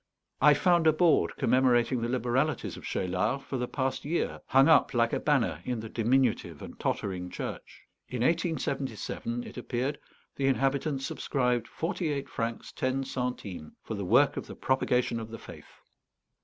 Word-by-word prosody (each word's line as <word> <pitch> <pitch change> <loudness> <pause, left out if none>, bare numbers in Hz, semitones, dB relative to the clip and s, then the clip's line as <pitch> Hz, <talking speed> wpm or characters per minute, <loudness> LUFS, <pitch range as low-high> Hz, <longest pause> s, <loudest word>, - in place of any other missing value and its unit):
I 150 +1 +7
found 170 +1 +3
a 155 - +6
board 155 - +3
commemorating 125 0 +3
the 115 - -1
liberalities 130 +4 0
of - - -11
Cheylard 100 +9 -1
for 135 - -4
the 125 - -1
past 130 0 -2
year, 160 +4 -2
hung 135 +1 +5
up, 160 -4 +5
like 115 -1 +2
a - - +1
banner, 115 - +1
in 125 -2 -2
the 110 - -7
diminutive 120 +1 +1
and - - -10
tottering 90 -2 -2
church. - - -7 0.3
In 125 -2 -2
1877, 135 - -1
it - - -10
appeared, 130 +3 -2 0.4
the 135 - +1
inhabitants 135 +1 +1
subscribed 125 -4 0
forty 170 -1 -2
eight 140 -1 -3
francs 115 0 -4
ten 130 +1 -1
centimes 125 - -4
for - - -5
the 100 -2 -3
"Work 125 +10 +4
of - - -4
the - - -8
Propagation 125 -2 +1
of 110 -1 -7
the 115 - -7
Faith." - - -13
130 Hz, 165 wpm, -29 LUFS, 115-140 Hz, 0.4 s, I